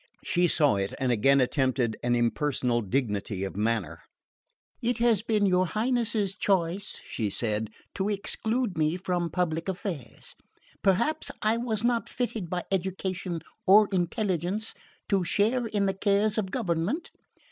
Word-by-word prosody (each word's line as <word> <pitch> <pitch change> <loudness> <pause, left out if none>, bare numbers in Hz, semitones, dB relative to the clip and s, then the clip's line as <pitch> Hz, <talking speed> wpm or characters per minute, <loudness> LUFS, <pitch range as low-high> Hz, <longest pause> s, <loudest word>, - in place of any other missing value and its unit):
She 175 0 +2
saw 145 -9 +3
it 100 0 -2
and 130 -1 0
again 135 +5 +4
attempted 130 -3 +1
an 120 0 +1
impersonal 120 0 +1
dignity 105 -4 -2
of 95 - -4
manner. 110 -1 -1 0.8
"It 240 +1 0
has 235 -4 +3
been 215 -2 +1
your 185 -1 +3
Highness's 220 -2 +1
choice," 190 0 0
she 110 -3 -2
said, 110 0 -1 0.2
"to 195 +1 -1
exclude 210 0 -1
me 155 +3 +2
from 180 -2 -1
public 165 0 -1
affairs. 175 - -5 0.5
Perhaps 235 +12 +2
I 215 +2 +3
was 230 -3 0
not 235 -1 +1
fitted 225 -7 -3
by 180 0 -2
education 185 -2 -2 0.3
or 210 +2 +7
intelligence 190 +2 0 0.4
to 195 -3 +2
share 225 +7 +1
in 205 -2 0
the 195 - +1
cares 205 +2 +2
of 195 -3 -2
government. 200 - -1
185 Hz, 140 wpm, -27 LUFS, 140-215 Hz, 0.8 s, or